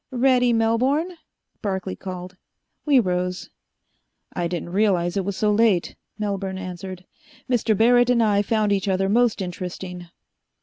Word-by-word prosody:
"Ready, 250 -1 +3
Melbourne?" 250 +9 +1 0.5
Barclay 190 -3 -3
called. 185 0 -8 0.5
We 280 -3 +6
rose. 180 -2 -2 0.8
"I 175 -1 -1
didn't 175 0 -5
realize 185 -3 +1
it 195 - 0
was 200 0 -4
so 210 -1 +2
late," 210 -4 +2 0.2
Melbourne 195 -2 -3
answered. 185 0 -7 0.4
"Mr. 230 -4 +1
Barrett 245 +2 +4
and 240 -2 +4
I 210 -2 +2
have 205 - 0
found 215 -2 +1
each 200 0 0
other 195 0 +1
most 225 -1 +2
interesting." 180 0 -6
200 Hz, 140 wpm, -23 LUFS, 185-230 Hz, 0.8 s, We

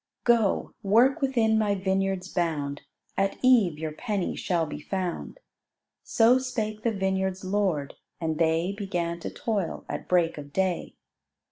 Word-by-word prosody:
"Go, 230 -4 +2
work 245 +10 +4
within 230 -5 +2
my 205 -2 +2
vineyard's 190 -1 -1
bound, 150 -6 -2 0.3
At 195 0 0
eve 225 -11 +5
your 155 0 -4
'penny' 200 +3 -2
shall 170 -3 0
be 150 - -6
found:" 185 - -4 0.6
So 240 +3 +4
spake 215 -5 -3
the 230 - +1
vineyard's 190 -1 -1
lord, 185 -8 0 0.3
and 160 -2 -2
they 165 +2 +2
Began 175 -4 -2
to - - -5
toil 205 -6 -3
at - - -5
break 170 -3 +2
of 145 -1 -10
day. 190 +1 -1
190 Hz, 140 wpm, -27 LUFS, 170-215 Hz, 0.6 s, eve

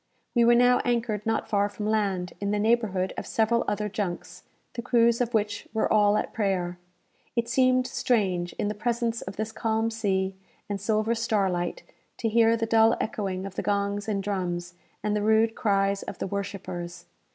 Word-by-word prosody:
We 235 -1 +4
were 240 0 +6
now 245 +1 +5
anchored 230 -3 -1
not 225 0 0
far 205 -1 +1
from 210 +1 -6
land, 200 -4 0
in 200 - -1
the 210 - +1
neighbourhood 210 -4 +1
of - - -8
several 225 +1 +2
other 210 0 -1
junks, 200 -4 -4 0.3
the 235 - -4
crews 235 -1 +3
of 240 -1 0
which 210 0 -1
were 220 - +1
all 210 -1 +4
at - - -3
prayer. 185 -4 -1 0.6
It 235 -1 0
seemed 255 +1 +3
strange, 185 -10 0
in - - -2
the 210 - -1
presence 235 +1 -1
of 190 - -7
this 220 +1 -3
calm 225 0 0
sea 190 -4 -1 0.3
and 200 -2 -4
silver 215 +2 +1
starlight, 195 -6 -1 0.3
to 225 - -1
hear 230 +1 +4
the 225 - -1
dull 225 0 +4
echoing 195 -3 -3
of 195 - -7
the - - -3
gongs 200 0 -1
and 200 -2 -1
drums, 175 -3 -3 0.3
and 210 0 0
the 210 - 0
rude 220 +1 +3
cries 200 -2 +1
of - - -7
the - - -3
worshippers. 180 -3 -5
210 Hz, 185 wpm, -26 LUFS, 195-230 Hz, 0.6 s, were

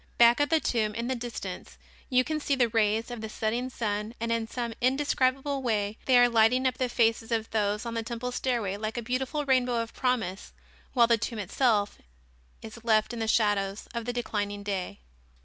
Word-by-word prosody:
Back 235 +2 +6
of 290 - +2
the 320 0 +4
tomb 215 -7 0
in 235 +2 -3
the - - +1
distance 240 -1 -7 0.3
you 255 -1 +4
can 310 +3 -2
see 285 -1 0
the 245 -3 +2
rays 220 +1 +1
of 240 -2 -6
the 220 - -5
setting 230 +4 -2
sun 215 -2 -3
and 230 0 -2
in 230 -1 0
some 235 0 -4
indescribable 270 +1 +1
way 215 -3 -1
they 255 -2 +5
are 245 0 +7
lighting 235 +2 +3
up 255 - 0
the 255 -1 0
faces 225 -1 +1
of 225 -1 -1
those 210 0 0
on 235 - -4
the 230 - -1
temple 235 +2 -4
stairway 235 -6 -1
like 215 +2 -4
a 240 - -2
beautiful 265 +5 -2
rainbow 255 -2 +2
of 230 0 -4
promise, 230 -7 -2 0.4
while 240 -3 +6
the 230 -1 +3
tomb 230 +1 -3
itself 210 0 +1 0.6
is 225 +1 -10
left 220 0 +2
in 235 - -5
the 225 - -1
shadows 205 -2 +1
of 235 -1 -4
the 245 - -1
declining 205 -4 -3
day. 190 - -4
230 Hz, 200 wpm, -28 LUFS, 215-250 Hz, 0.6 s, are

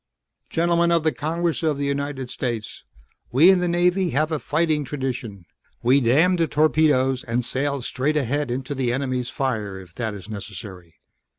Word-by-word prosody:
"Gentlemen 170 +1 +2
of 165 -2 +3
the 160 - +2
Congress 165 +2 -2
of 155 -3 +1
the 140 - -2
United 140 -2 -2
States. 120 -4 -4 0.5
We 155 +10 +7
in 190 - +3
the 180 - 0
Navy 175 +1 +2
have 155 +2 0
a 155 - 0
fighting 155 0 0
tradition. 125 -9 -5 0.4
We 130 +4 +4
'damn 155 +10 +4
the 165 -1 +2
torpedoes' 145 -4 +2
and 120 0 -1
sail 140 +2 -1
straight 145 +5 -1
ahead 145 +1 -1
into 130 +3 -3
the 130 -3 -1
enemy's 130 -1 -2
fire 110 -8 -2
if 90 -3 -14
that 110 -1 -3
is 100 -1 -10
necessary. 100 -5 -9
140 Hz, 170 wpm, -23 LUFS, 120-155 Hz, 0.5 s, We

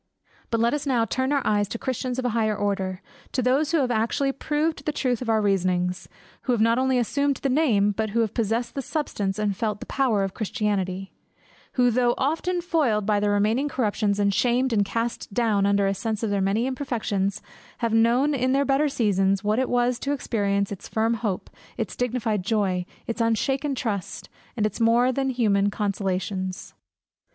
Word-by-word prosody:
BUT 230 - 0
let 235 +3 +2
us 295 -1 -2
now 240 -4 +2
turn 260 +5 -1
our 285 -1 +1
eyes 205 -1 +2
to 230 - -5
Christians 255 0 -3
of 260 - -2
a - - +2
higher 215 -2 0
order, 195 -2 -2 0.3
to 255 - 0
those 275 +5 +2
who 335 - +3
have 250 -2 0
actually 240 +5 +1
proved 295 +1 -2
the 300 - +1
truth 255 -5 -1
of 245 - -4
our 220 -1 +2
reasonings; 185 -2 0 0.3
who 255 - 0
have 235 - 0
not 230 +2 +3
only 260 0 +2
assumed 280 +4 +1
the 275 - -2
name, 240 -8 +3
but 220 +2 -2
who 230 +3 +1
have 220 -3 -1
possessed 230 +1 -1
the 275 - -3
substance, 210 - -2
and 210 -2 0
felt 210 0 -2
the - - -7
power 245 -7 +1
of 195 -1 -3
Christianity; 195 -4 -2 0.6
who 245 -1 +3
though 240 0 +2
often 330 +6 0
foiled 275 - +1
by 210 -1 +2
their 205 0 +1
remaining 215 +8 +1
corruptions, 210 -5 0
and 200 -1 +2
shamed 245 +4 +2
and 205 -2 +3
cast 230 +2 -3
down 215 -5 +2
under 200 0 +3
a 195 - +2
sense 220 +2 -3
of 220 - 0
their 200 -1 +1
many 200 +5 +1
imperfections, 220 -7 -2 0.4
have 230 -2 -1
known 240 +6 +3
in 260 -1 +1
their 280 +1 +2
better 280 +2 +2
seasons, 195 -6 +1
what 210 +3 +1
it 260 - 0
was 245 0 +1
to 280 - -1
experience 200 -7 -1
its 200 - -7
firm 225 +1 +1
hope, 215 -5 -2 0.3
its - - -3
dignified 235 -4 -1
joy, 185 -4 0 0.2
its 230 0 -3
unshaken 270 +5 0
trust, 210 -7 -4 0.3
its 215 -1 -1
more 235 +2 +4
than 270 +1 -1
human 205 -5 +2
consolations. 190 -2 -3
225 Hz, 195 wpm, -25 LUFS, 205-255 Hz, 0.6 s, more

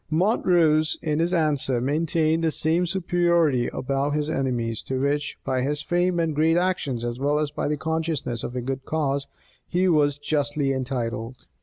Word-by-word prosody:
Montrose, 160 -3 +3
in 155 -1 0
his 170 +2 +1
answer, 150 -7 +1
maintained 155 +4 +1
the 165 - +3
same 165 +3 +1
superiority 170 -7 +2
above 140 +2 -1
his 150 +1 -1
enemies, 120 -6 -1
to 130 -1 -2
which, 145 +2 -1
by 130 -1 0
his 145 +3 -1
fame 175 0 +1
and 165 -2 0
great 160 +3 +3
actions, 155 -10 -1
as 120 +1 -4
well 145 +2 +1
as 150 -1 -1
by - - -2
the 150 0 -1
consciousness 160 -6 -2
of 125 - -5
a 125 - -2
good 135 +1 -4
cause, 140 -3 -1 0.4
he 180 +1 +1
was 145 -4 +3
justly 145 -1 0
entitled. 125 -2 -4
150 Hz, 170 wpm, -24 LUFS, 135-165 Hz, 0.4 s, Montrose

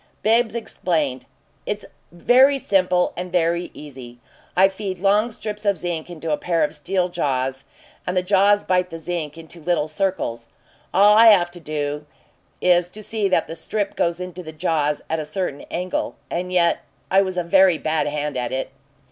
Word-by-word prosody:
Bibbs 225 +2 +3
explained. 155 - -2 0.4
"It's - - -4 0.3
very 255 +10 +4
simple 185 -6 +1
and 180 0 -5
very 170 0 +1
easy. 130 -5 -10 0.4
I 190 +1 +7
feed 195 -1 -5
long 205 +5 +2
strips 210 -2 -6
of 200 -2 +2
zinc 170 -1 -4
into 165 -2 -5
a 150 - +1
pair 170 -2 0
of - - -1
steel 180 +4 -1
jaws, 135 -6 -2 0.4
and 180 +1 -1
the 180 - +2
jaws 200 +2 +4
bite 180 -1 +1
the 165 - -7
zinc 165 -2 -4
into 165 +1 -10
little 165 -1 0
circles. 155 -9 -2 0.4
All 205 +2 +6
I 225 +1 +8
have 180 -5 +6
to 175 - -9
do 150 -1 -4 0.5
is 175 -1 +3
to 215 +4 -7
see 210 -2 -1
that 175 -3 +2
the 165 - -7
strip 200 +5 -2
goes 170 0 0
into 180 0 -6
the 160 -3 -8
jaws 155 -2 -1
at 160 - -1
a - - -2
certain 155 -2 -4
angle 180 +1 -3 0.2
and 180 +1 -3
yet 175 -2 +3 0.3
I 195 +1 +6
was 185 -2 -3
a 180 - +1
very 185 0 +4
bad 155 0 0
hand 150 0 -3
at 125 -1 -2
it." 130 0 -3
175 Hz, 180 wpm, -22 LUFS, 155-190 Hz, 0.5 s, I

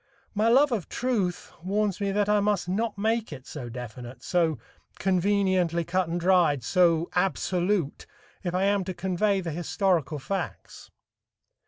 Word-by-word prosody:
My 215 +1 +2
love 270 +4 +5
of 215 -8 -2
truth 215 -8 -2
warns 205 +1 0
me 200 -1 0
that 205 0 +1
I 210 0 +3
must 205 -3 0
not 210 +4 -1
make 220 +1 0
it 135 -3 -9
so 130 -5 -7
definite, 120 +1 -8
so 165 -4 +1 0.4
conveniently 185 -2 +1
cut 185 +1 0
and 170 +1 -1
dried, 170 -7 +3
so 170 +3 +3
absolute 180 -2 0 0.4
if 175 -1 -2
I 185 - +1
am 200 0 +2
to 185 -1 -4
convey 190 +2 0
the 170 -2 -4
historical 170 -1 0
facts. 175 +5 -5
185 Hz, 150 wpm, -27 LUFS, 170-205 Hz, 0.4 s, love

